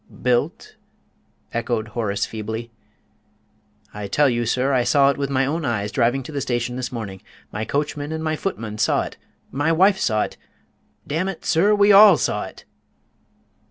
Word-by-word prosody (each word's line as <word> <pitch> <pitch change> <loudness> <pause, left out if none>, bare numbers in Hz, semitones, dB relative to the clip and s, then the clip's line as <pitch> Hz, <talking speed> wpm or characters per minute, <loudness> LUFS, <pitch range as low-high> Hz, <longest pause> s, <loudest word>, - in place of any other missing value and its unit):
"Built!" 125 -1 -1 0.8
echoed 115 -1 -2
Horace 110 -3 -2
feebly. 110 +2 -6 1.2
"I 105 -1 -5
tell 145 +9 +3
you, 120 -2 0
sir, 130 +4 +1
I 125 -2 +3
saw 140 +3 +4
it 140 - -6
with 140 -1 -1
my 135 -1 +1
own 160 +5 -2
eyes 105 -6 -2
driving 125 +2 +1
to 145 - -9
the 140 -2 -3
station 120 -1 -2
this 125 +1 -4
morning; 105 -6 -6 0.3
my 110 +1 -3
coachman 145 +2 -2
and 160 -1 -2
footman 110 - -4
saw 115 - +2
it; - - -9 0.3
my 145 +4 0
wife 190 +4 +4
saw 110 -2 +1
it - - -7 0.7
damn 165 +6 -1
it, 190 - -8
sir, 195 +6 +3
we 205 0 +5
all 200 -3 +8
saw - - -1
it!" - - -13
130 Hz, 165 wpm, -22 LUFS, 115-155 Hz, 1.2 s, all